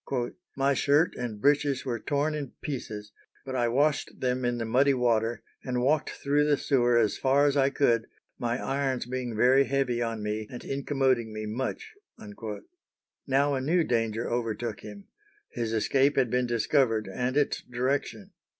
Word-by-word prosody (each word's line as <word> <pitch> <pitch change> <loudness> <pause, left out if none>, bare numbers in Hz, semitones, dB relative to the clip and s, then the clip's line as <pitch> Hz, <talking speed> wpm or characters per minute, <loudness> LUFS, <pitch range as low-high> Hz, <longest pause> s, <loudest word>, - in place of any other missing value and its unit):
"My 140 +1 +3
shirt 145 +4 +3
and 120 -4 -5
breeches 145 +1 +2
were 120 -3 -2
torn 145 +6 0
in 145 -3 -5
pieces, 105 -7 -5 0.3
but 130 -1 -5
I 120 -2 +2
washed 145 +5 0
them 125 0 -1
in 120 0 0
the 115 - -2
muddy 135 +5 +3
water, 115 -2 +1 0.2
and 125 -1 -1
walked 150 +4 +2
through 145 +1 +1
the 150 -1 +3
sewer 120 -4 +2
as 110 -3 +1
far 140 +2 +3
as 145 -1 +2
I 135 -1 +4
could, 120 -5 +1 0.3
my 120 0 -1
irons 135 -2 -1
being 125 -2 -4
very 130 +5 +5
heavy 135 -3 0
on 115 -2 -2
me 105 0 -3
and 120 - -8
incommoding 135 -4 0
me 110 0 -5
much." 130 - -4 1.3
Now 140 +2 +2
a 135 - -1
new 165 +6 +2
danger 115 -3 -1
overtook 115 -1 -2
him: 105 -2 -10 0.5
his 115 -2 -3
escape 135 +5 +2
had 125 -4 +2
been 125 0 +1
discovered 115 -2 +1
and 125 +8 -2
its 145 - +1
direction. 125 -3 -2
125 Hz, 165 wpm, -28 LUFS, 115-140 Hz, 1.3 s, very